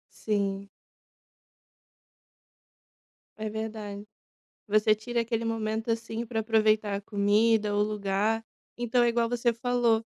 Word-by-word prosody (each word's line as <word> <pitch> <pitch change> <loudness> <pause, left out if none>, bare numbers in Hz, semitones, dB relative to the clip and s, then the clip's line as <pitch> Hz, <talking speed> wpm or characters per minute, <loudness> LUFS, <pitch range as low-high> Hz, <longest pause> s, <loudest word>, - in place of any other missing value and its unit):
Sim. 200 -2 -2 2.7
É 215 0 -3
verdade. 215 -2 -5 0.6
Você 215 0 +4
tira 235 +3 -2
aquele 230 0 -1
momento 225 0 -2
assim 225 0 -2
pra 225 -1 -2
aproveitar 215 -2 +2
a 200 - -2
comida 205 +1 +2
o 205 - +3
lugar 210 +1 0 0.3
então 240 0 +2
é - - +4
igual 235 0 +1
você 240 0 +1
falou 235 -1 +1
220 Hz, 110 wpm, -28 LUFS, 210-230 Hz, 2.7 s, Você